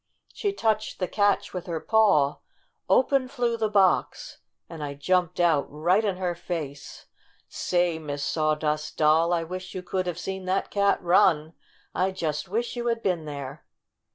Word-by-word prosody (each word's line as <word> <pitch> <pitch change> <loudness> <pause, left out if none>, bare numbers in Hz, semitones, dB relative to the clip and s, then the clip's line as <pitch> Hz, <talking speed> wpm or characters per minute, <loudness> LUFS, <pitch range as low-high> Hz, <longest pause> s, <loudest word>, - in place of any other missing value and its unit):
She 410 - -1
touched 220 - -1
the 185 - -1
catch 205 +1 +1
with 180 -1 -5
her 165 -2 -2
paw, 190 -7 +3 0.5
open 265 0 +3
flew 245 -3 -1
the 220 -2 -1
box, 195 -3 +1 0.3
and 160 -3 -8
I 140 -1 -5
jumped 180 +4 0
out 165 -5 +3
right 175 +8 +1
in 200 -4 -1
her 180 -1 -1
face! 155 -5 -6 0.4
Say, 175 -2 0
Miss 145 -2 -5
Sawdust 155 -1 -1
Doll, 160 +2 +4
I 170 -1 +1
wish 185 +2 -7
you 185 - -5
could 185 0 -2
have 175 -2 -3
seen 190 +1 -5
that 185 +1 -1
cat 200 -1 +2
run! 165 -3 +3 0.4
I 185 +1 +1
just 165 -5 -3
wish 235 +6 -2
you 240 0 -3
had 230 -1 -1
been 175 -5 0
there!" 140 -3 -7
180 Hz, 165 wpm, -26 LUFS, 155-200 Hz, 0.5 s, Doll